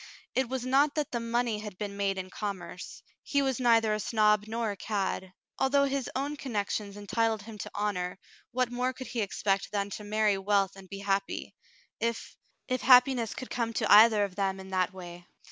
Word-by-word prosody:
It 260 -2 0
was 260 -1 -3
not 280 +3 +3
that 300 -3 -1
the 240 - -1
money 230 -1 0
had 210 -3 -8
been 200 0 -5
made 200 -1 0
in 185 0 -5
commerce; 185 -4 -6 0.2
he 280 -1 +1
was 265 -2 0
neither 230 -3 +4
a 215 - -1
snob 210 -1 +2
nor 225 -1 -1
a - - -5
cad. 195 -2 -2 0.3
Although 280 +1 +3
his 275 -2 -2
own 285 +3 -2
connections 205 -5 -3
entitled 215 +1 0
him 220 -1 -10
to - - -5
honor, 190 -3 -2 0.3
what 250 0 0
more 250 +1 -1
could 260 0 -8
he 235 - -3
expect 195 -1 -1
than 200 -1 -2
to 210 - -6
marry 210 -1 +1
wealth 195 -1 +1
and 190 -1 -13
be 200 - -6
happy, 195 0 -2 0.5
if 230 0 -3 0.2
— - - -49
if 255 -1 -1
happiness 250 -2 +5
could 255 - -7
come 230 -1 -1
to - - 0
either 215 0 +8
of 200 -2 -3
them 195 -1 -1
in 190 0 -10
that 185 -1 +1
way. 175 -2 -10
215 Hz, 200 wpm, -29 LUFS, 200-245 Hz, 0.5 s, either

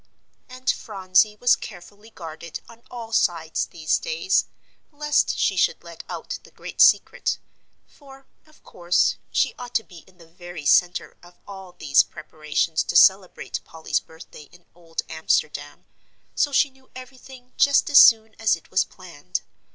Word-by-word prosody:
And 255 +1 -13
Phronsie 190 +1 +1
was 245 +3 +3
carefully 205 +2 -12
guarded 165 -4 -9
on 230 0 -16
all 235 -2 -8
sides 165 -5 0
these 155 -2 -1
days, 480 -6 0 0.4
lest 295 0 0
she - - +1
should - - +1
let - - -11
out - - -6
the - - -18
great - - -5
secret, - - +3 0.5
for, 270 -2 -17 0.2
of 310 - -24
course, 175 0 0
she - - +1
ought 245 -1 -9
to 225 - +2
be 175 -5 -14
in 185 -1 -23
the 170 - -17
very 175 -2 -11
centre 180 +4 +2
of 175 0 -18
all 190 -2 -11
these 145 -5 +3
preparations 155 +1 -3
to - - -4
celebrate 190 -1 +3
Polly's 160 -1 -3
birthday 160 -2 -15
in 175 -1 -20
Old 165 -1 -6
Amsterdam, 150 -2 -2 0.5
so 290 - +1
she 280 0 +2
knew 265 0 -26
everything 255 0 -13
just 280 -1 +4
as 280 - +9
soon 220 -1 +6
as 225 -1 +3
it - - -18
was - - +3
planned. - - -7
190 Hz, 155 wpm, -23 LUFS, 165-250 Hz, 0.5 s, as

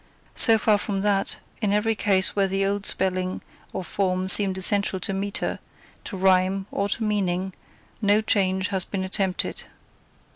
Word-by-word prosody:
So 225 -2 +6
far 215 -1 +2
from 200 -2 -3
that, 200 -1 0 0.2
in 210 -2 0
every 210 +2 +1
case 195 -3 +1
where 200 -1 +2
the 195 +1 -1
old 200 +1 -2
spelling 185 -1 -1 0.3
or 190 - -5
form 185 0 -2
seemed 190 0 +4
essential 195 0 +3
to 195 - -3
metre, 200 +1 -3 0.5
to 195 - -6
rhyme, 190 +1 +2
or 200 - -1
meaning, 190 -4 -1 0.5
no 205 0 +3
change 190 -3 +1
has 190 -2 +1
been 190 0 -4
attempted. 190 0 -2
195 Hz, 150 wpm, -24 LUFS, 185-205 Hz, 0.5 s, So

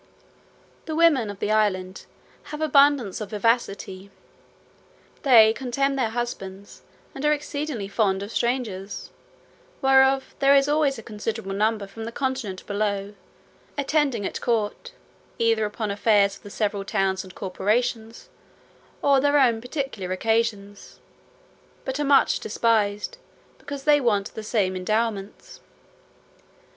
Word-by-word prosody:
The 315 - -4
women 305 -9 +4
of 200 - -7
the 210 - -2
island 190 -3 0 0.4
have 300 - -7
abundance 280 -8 +3
of 210 - -5
vivacity: 200 -3 -1 1.1
they 225 -6 +7
contemn 275 +3 -1
their 255 -5 0
husbands, 200 -4 -6 0.3
and 270 - -7
are 300 - +3
exceedingly 290 -7 -3
fond 200 -2 0
of 205 - -7
strangers, 225 -6 -3 0.7
whereof 265 0 +3
there 275 0 +5
is 275 0 +4
always 290 -2 +2
a 225 - -9
considerable 215 -2 -5
number 210 +1 0
from 220 +3 -9
the 230 - -5
continent 255 -7 -3
below, 205 -1 -2 0.6
attending 280 -6 0
at - - -4
court, 235 - -2 0.4
either 225 -1 +2
upon 210 0 -3
affairs 200 -1 +3
of - - -16
the 205 - -11
several 205 -1 -2
towns 195 -2 0
and 185 -1 -13
corporations, 220 +4 -2 0.8
or 280 -1 +5
their 285 +2 +3
own 235 -4 +3
particular 245 - -4
occasions, 205 0 -2 0.9
but 265 +1 -3
are - - +1
much 280 0 +4
despised, 210 -2 0 0.4
because 285 -2 -7
they 295 0 +4
want 210 -5 0
the 220 - -6
same 205 -4 0
endowments. 210 +1 -3
225 Hz, 130 wpm, -24 LUFS, 200-270 Hz, 1.1 s, they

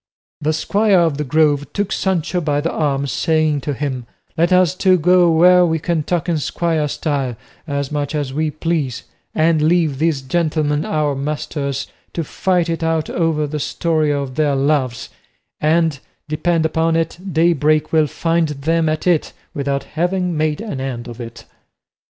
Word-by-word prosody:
The 155 +1 +1
squire 200 +5 +2
of 160 -4 +1
the - - 0
Grove 145 0 +1
took 205 -1 -2
Sancho 180 -2 0
by 145 -2 0
the 165 +3 -1
arm, 140 -3 0
saying 155 +4 +1
to 145 +1 -3
him, 130 -4 -4 0.3
"Let 170 +2 +2
us 185 -2 +4
two 185 0 +3
go 180 +1 +4
where 180 +2 +6
we 160 -2 +1
can 165 0 -1
talk 170 +1 -2
in 165 -3 +1
squire 160 0 -1
style 145 -4 -2 0.3
as 140 -1 -2
much 145 0 -2
as 145 -3 -2
we 155 +2 0
please, 150 -6 -2 0.3
and 160 0 +3
leave 155 -3 +2
these 155 -4 +1
gentlemen 150 0 0
our 150 -2 0
masters 140 -1 -3 0.3
to 170 - -2
fight 175 +3 0
it 165 0 -2
out 165 -1 0
over 165 -3 0
the 150 +1 -4
story 155 0 0
of 140 -2 -2
their 145 0 +1
loves; 135 -3 0 0.5
and, 160 -2 +2 0.3
depend 160 +2 0
upon 165 +1 +1
it, 165 +1 -1
daybreak 155 -2 +2
will 155 -1 +4
find 165 +2 0
them 160 +3 0
at 155 0 -2
it 175 -4 +1 0.2
without 140 -1 -2
having 180 +2 -1
made 155 +1 0
an 180 -13 -5
end 125 -3 -4
of 120 0 -8
it." 115 -1 -9
155 Hz, 170 wpm, -19 LUFS, 145-165 Hz, 0.5 s, where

